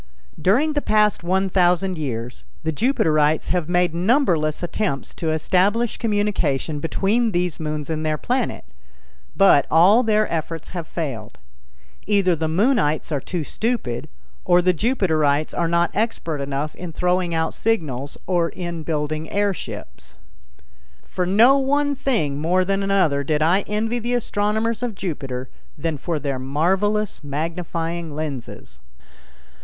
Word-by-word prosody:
During 255 - +3
the 290 - 0
past 210 -6 +2
one 190 +2 +1
thousand 180 0 +2
years, 125 - -5 0.2
the 160 - 0
Jupiterites 155 - +2
have 175 -3 -1
made 175 -1 +2
numberless 175 - +1
attempts 175 -5 -2
to 165 - -3
establish 190 +8 +1
communication 200 - 0
between 205 +9 +1
these 175 -2 -1
moons 150 -2 -3
and 160 -1 -3
their 155 -1 0
planet, 245 - -2 0.7
but 195 -8 +5
all 185 +9 +6
their 215 -2 +2
efforts 165 0 -4
have 170 -3 -6
failed. 130 -10 -5 0.7
Either 195 -4 +3
the 160 0 -2
Moonites 175 - +1
are 145 - 0
too 175 +2 -3
stupid, 215 - -3 0.3
or 175 0 +4
the 180 +1 +3
Jupiterites 155 - +1
are 170 - +1
not 170 +1 +1
expert 170 -9 -2
enough 140 +2 -3
in 180 -1 -7
throwing 180 0 0
out 160 0 0
signals 145 - -2
or 175 -2 +1
in 175 -2 -5
building 155 0 -3
air 205 0 +1
ships. - - -9 0.9
For 180 -1 -2
no 235 +9 +6
one 285 +2 +1
thing 155 - -1
more 180 +3 +2
than 195 +1 0
another 185 -8 +2
did 155 +1 +1
I 175 +5 +3
envy 225 +3 -1
the 240 +2 -1
astronomers 220 0 0
of 240 -4 -3
Jupiter 135 -9 -4 0.3
than 160 -3 -3
for 165 +3 -2
their 140 -3 -3
marvelous 190 +10 0
magnifying 165 +2 -3
lenses. 140 - -6
175 Hz, 140 wpm, -22 LUFS, 155-205 Hz, 0.9 s, all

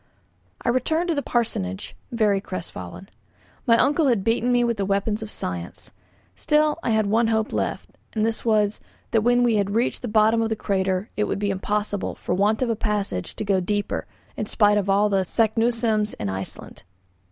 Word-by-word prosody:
I - - +1
returned 315 +8 +1
to - - +3
the 285 - -1
parsonage, 95 - -2 0.2
very 210 -4 +2
crestfallen. 175 - -7 0.6
My 230 -1 +6
uncle 290 +4 +3
had 230 -7 +2
beaten 230 +3 +1
me 245 0 +3
with 235 -2 0
the 200 - 0
weapons 200 +2 0
of 220 - -6
science. 90 - -6 0.4
Still 300 - +2
I - - -2
had 220 -1 +2
one 225 +3 +2
hope 220 0 0
left, - - -3 0.2
and 215 -1 +1
this 225 0 -1
was, 215 -2 +2 0.3
that 225 - +3
when 245 +2 +3
we 235 -3 +3
had 200 0 0
reached 235 +2 0
the 245 - -4
bottom 220 +1 +3
of 225 - 0
the 220 - 0
crater 190 -1 -1
it 210 - +1
would - - -2
be 200 0 0
impossible, 205 +1 -2
for - - -3
want 210 +6 +2
of 245 - -1
a - - 0
passage, 210 - -2
to 215 - -4
go 195 -2 +2
deeper, 205 +3 -2 0.3
in 215 - -3
spite 205 -1 +3
of 200 -1 -3
all 200 +2 +4
the 195 -2 +1
Saknussemm's 225 +1 +1
in 100 - -4
Iceland. 95 0 -6
215 Hz, 195 wpm, -24 LUFS, 200-230 Hz, 0.6 s, My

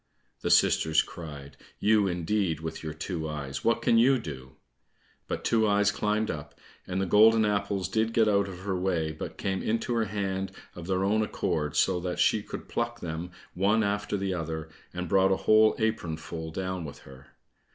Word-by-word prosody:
The - - -2
sisters 80 -1 +4
cried, 70 -4 -9 0.2
"You 105 -1 +3
indeed, 90 -1 0
with 80 0 -6
your 80 - -4
two 80 -1 -4
eyes, 70 -3 -5
what 115 - +2
can 115 - +4
you 130 +3 +5
do?" 65 - -8 0.7
But - - -4
Two 110 -2 +3
eyes 100 0 +3
climbed 105 +1 0
up, 75 -2 -8 0.3
and 95 +1 -2
the 95 - +1
golden 110 +3 +6
apples 100 -2 0
did 110 +3 0
get 115 -1 +3
out 100 -1 +3
of 95 -1 -8
her 95 -1 -2
way, 90 -4 0
but 80 - -7
came 95 -1 -2
into 115 +2 -1
her 115 -1 +1
hand 95 -2 -3 0.2
of 85 -1 -9
their 95 0 0
own 105 +3 +2
accord, 75 -8 -2
so 90 -2 +2
that 90 0 -3
she - - +3
could - - -8
pluck - - -2
them 85 +1 -5 0.2
one 105 +4 +2
after 105 0 -1
the 95 -1 -1
other, 80 -2 -4 0.2
and 90 0 -4
brought 95 +2 +3
a 95 - +3
whole 110 0 +6
apronful 80 -6 -3
down 95 0 -3
with 75 -3 -9
her. 65 0 -15
95 Hz, 185 wpm, -28 LUFS, 80-105 Hz, 0.7 s, golden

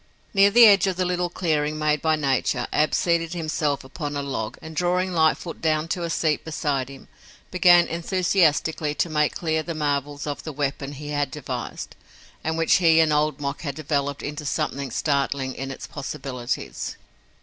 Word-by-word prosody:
Near 200 0 +6
the 235 +3 +8
edge 200 -3 +6
of 190 - 0
the 185 +1 0
little 180 0 0
clearing 155 -4 -1
made 150 -1 +1
by 160 -1 +2
nature, 135 -4 0
Ab 155 - +2
seated 170 -1 +1
himself 155 -4 -1
upon 145 +2 -5
a 140 - -2
log, 120 -6 -4
and 160 0 -10
drawing 180 +3 +1
Lightfoot 165 +1 +1
down 155 0 +1
to 175 - -2
a 170 - -2
seat 155 -2 0
beside 145 -4 -2
him, 135 -1 -12 0.4
began 175 -1 +6
enthusiastically 165 -3 +1
to 170 - 0
make 150 -1 +1
clear 160 -2 0
the 165 +1 -5
marvels 145 -1 -2
of 145 -1 -4
the 160 - -6
weapon 140 0 -3
he 145 +1 -8
had 145 -2 0
devised 130 -4 -6 0.5
and 160 0 -1
which 165 0 +4
he 165 -3 +5
and 160 -2 +4
Old 150 -1 +1
Mok 140 0 -4
had 140 -4 -4
developed 145 -2 -2
into 150 +1 -5
something 140 -1 -2
startling 140 -1 -1
in 135 0 -5
its 135 - -7
possibilities. 135 -3 -5
150 Hz, 180 wpm, -24 LUFS, 140-165 Hz, 0.5 s, the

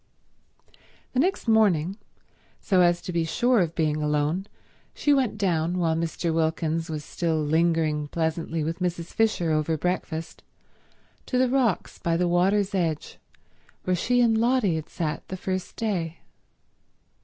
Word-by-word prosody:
The 255 - +1
next 360 -2 0
morning, 195 -6 +3 0.6
so 185 -3 +2
as 175 0 +3
to 180 - -5
be 170 -1 +1
sure 240 +9 +2
of 170 -3 0
being 155 -2 0
alone, 150 +5 0 0.5
she 290 - +2
went 255 -6 +1
down, 175 -3 0
while 165 -2 +1
Mr. 165 0 -2
Wilkins 160 0 0
was 150 -2 -4
still 165 -2 -1
lingering 155 -1 +1
pleasantly 160 0 -2
with 165 +3 -3
Mrs. 175 -2 -3
Fisher 215 -7 +1
over 155 +1 +1
breakfast, 165 -1 -3 0.9
to 255 - 0
the 255 0 +3
rocks 250 -7 0
by 165 -1 0
the 180 0 +1
water's 190 +3 +2
edge 165 -5 -2 0.6
where 185 - +1
she 245 +7 +2
and 225 -2 +3
Lotty 235 -5 +2
had 160 -1 -5
sat 155 -3 -3
the 185 - -5
first 185 0 -4
day. 175 -8 -2
170 Hz, 145 wpm, -25 LUFS, 160-200 Hz, 0.9 s, morning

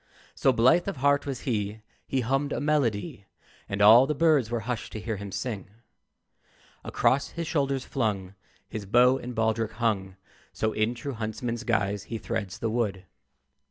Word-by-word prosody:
So 135 - +3
blithe 130 +10 +4
of 195 - -3
heart 140 +2 +2
was 130 -4 -4
he, 105 -3 -2 0.3
He 135 - 0
hummed 135 +4 0
a - - -2
melody, 135 - -1 0.4
And 100 +1 0
all 115 +5 +8
the 150 - -1
birds 150 -6 +3
were 120 -1 -2
hushed 120 +1 -4
to 110 - -4
hear 110 0 -3
him 100 0 -7
sing. 100 0 -4 1.1
Across 140 +2 +1
his 170 - -2
shoulders 140 -4 -1
flung 100 -7 -2 0.3
His 105 -3 -6
bow 125 +5 +5
and 125 0 -7
baldric 110 0 0
hung: 100 -5 -1 0.4
So, 110 0 -1
in 110 +3 0
true 135 +4 -5
huntsman's 115 +2 -4
guise, 105 -4 0
he 115 - -4
threads 105 -4 -4
the 115 - -2
wood. 105 -5 -1
115 Hz, 165 wpm, -27 LUFS, 105-135 Hz, 1.1 s, all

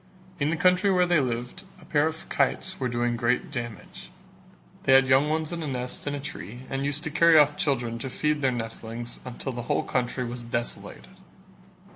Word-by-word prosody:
In 145 +1 +1
the 165 - +1
country 180 +3 +4
where 180 -2 +4
they 175 -2 +3
lived, 125 +6 -3 0.2
a 170 - -16
pair 150 +1 +2
of 160 0 -6
kites 190 0 0
were 130 -2 -1
doing 120 0 0
great 120 +4 0
damage: 120 -5 -7 0.8
they 135 - +5
had 135 0 +7
young 135 +3 +4
ones 155 0 -1
in 170 -1 -4
a 155 - -3
nest 125 0 -4
in 145 - -1
a - - -4
tree 120 -4 -7
and 135 0 -1
used 145 +1 -2
to 160 - -3
carry 165 +1 +6
off 150 -1 +5
children 120 -6 -1
to 135 - -4
feed 150 +3 0
their 135 - +3
nestlings 115 0 -5
until 125 +2 -5
the 120 -1 -5
whole - - +2
country 125 0 -1
was 120 +1 -5
desolated. 120 0 -4
135 Hz, 200 wpm, -26 LUFS, 120-150 Hz, 0.8 s, had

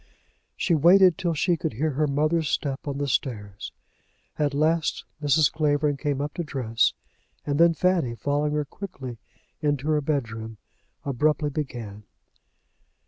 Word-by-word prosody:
She 175 - 0
waited 175 +3 +6
till 175 -4 -1
she 175 +3 +2
should 160 - -1
hear 150 +7 0
her 150 +2 +1
mother's 155 +2 +1
step 140 -1 -2
on 140 -1 -2
the 145 0 -1
stairs. 105 -6 -3 0.7
At 145 -2 +1
last 155 +2 +1 0.2
Mrs. 145 +1 +4
Clavering 145 -1 +1
came 140 -1 -1
up 145 0 -3
to 175 - -3
dress, 125 -7 +1 0.5
and 145 0 -1
then 170 0 +6
Fanny, 170 -9 +1
following 145 +4 0
her 150 -1 0
quickly 135 - -8 0.4
into 145 -1 0
her 150 -1 +2
bedroom, 115 -7 -3 0.5
abruptly 150 +2 +1
began. 120 -8 -5
145 Hz, 140 wpm, -25 LUFS, 135-155 Hz, 0.7 s, waited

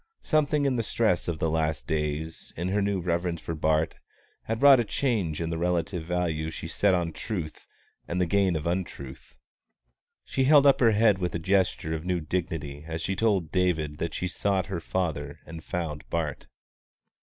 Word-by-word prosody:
Something 150 -2 +2
in 130 -2 +1
the - - +2
stress 110 -5 +1
of 85 -2 -1
the 80 0 0
last 80 -1 0
days, 80 +1 -3
in 85 +3 -2
her 100 +2 +1
new 100 -1 0
reverence 85 -1 -1
for 80 - -5
Bart, 80 0 +1 0.5
had 115 0 -2
wrought 140 -1 +8
a - - +3
change 105 - -1
in 85 0 -2
the 80 - -2
relative 85 0 -1
value 85 -3 -1
she 80 +1 -6
set 95 +3 +2
on 85 -2 -1
truth 85 -8 -5 0.4
and 85 - -2
the 90 - +3
gain 95 -1 +2
of 75 - -3
untruth. 70 -8 -4 0.9
She 135 - 0
held 145 0 +7
up 140 - +6
her 115 -3 +5
head 105 -2 +4
with 90 -2 -2
a - - +2
gesture 90 -2 +1
of 80 -1 -3
new 90 0 0
dignity 75 -3 -3
as 80 0 -4
she 95 - -1
told 95 -7 +1
David 80 -5 0
that 85 -1 -3
she - - -2
had 90 - -3
sought 95 -1 0
her 90 -1 -4
father 75 -5 -3
and 80 0 -9
found 80 -4 -4
Bart. 75 -7 -3
85 Hz, 190 wpm, -27 LUFS, 80-100 Hz, 0.9 s, wrought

